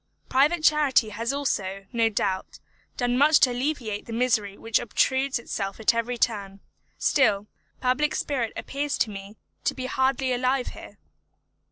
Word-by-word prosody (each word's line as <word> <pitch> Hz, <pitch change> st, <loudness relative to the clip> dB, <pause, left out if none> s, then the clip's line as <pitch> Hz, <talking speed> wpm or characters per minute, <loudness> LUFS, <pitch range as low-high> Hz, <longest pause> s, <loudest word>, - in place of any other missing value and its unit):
Private 300 Hz, +5 st, +3 dB
charity 290 Hz, -7 st, +4 dB
has 230 Hz, +4 st, -3 dB
also, 195 Hz, -9 st, -2 dB
no 230 Hz, -1 st, +3 dB
doubt, 190 Hz, -3 st, -2 dB, 0.4 s
done 245 Hz, 0 st, +1 dB
much 300 Hz, +2 st, +6 dB
to 255 Hz, -, +5 dB
alleviate 245 Hz, -5 st, -3 dB
the 230 Hz, -, -6 dB
misery 220 Hz, -4 st, 0 dB
which 225 Hz, 0 st, 0 dB
obtrudes 260 Hz, +4 st, +1 dB
itself 200 Hz, -4 st, -4 dB
at 220 Hz, -, +3 dB
every 230 Hz, +1 st, -2 dB
turn; 200 Hz, -4 st, -1 dB, 0.4 s
still, 215 Hz, -8 st, +2 dB, 0.4 s
public 260 Hz, +4 st, +1 dB
spirit 250 Hz, -6 st, -1 dB
appears 285 Hz, +1 st, -3 dB
to 220 Hz, -, 0 dB
me 200 Hz, +1 st, -9 dB, 0.3 s
to -, -, 0 dB
be 255 Hz, -, -5 dB
hardly 260 Hz, 0 st, +1 dB
alive 255 Hz, +1 st, 0 dB
here. -, -, -12 dB
245 Hz, 150 wpm, -25 LUFS, 215-270 Hz, 0.4 s, much